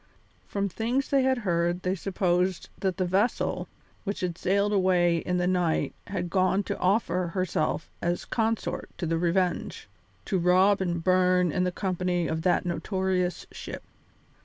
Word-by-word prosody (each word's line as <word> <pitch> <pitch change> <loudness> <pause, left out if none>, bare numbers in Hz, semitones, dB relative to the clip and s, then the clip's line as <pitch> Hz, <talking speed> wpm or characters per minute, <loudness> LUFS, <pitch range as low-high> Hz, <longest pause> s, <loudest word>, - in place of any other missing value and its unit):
From 200 0 -1
things 235 +8 -1
they 275 -1 +3
had 260 0 +2
heard 175 -4 0
they 185 - +1
supposed 185 -1 0
that 190 -2 -1
the 185 - +1
vessel 195 +7 0 0.4
which 200 -1 -3
had 180 -2 -1
sailed 200 +3 +1
away 180 -3 +3
in 180 +2 -1
the 180 - +1
night 180 -3 +1
had 180 -3 -3
gone 190 +2 +2
to - - -3
offer 185 -2 +1
herself 170 -4 -1
as 175 +1 -1
consort 225 -2 -1
to 175 - -3
the 165 0 0
Revenge; 175 - 0 0.4
to 190 - 0
rob 185 +3 +4
and 170 -2 -1
burn 185 -1 +3
in 180 +4 +1
the 180 - 0
company 180 -2 -1
of 160 0 -2
that 180 +1 +2
notorious 185 0 -1
ship. - - -7
185 Hz, 160 wpm, -27 LUFS, 175-195 Hz, 0.4 s, rob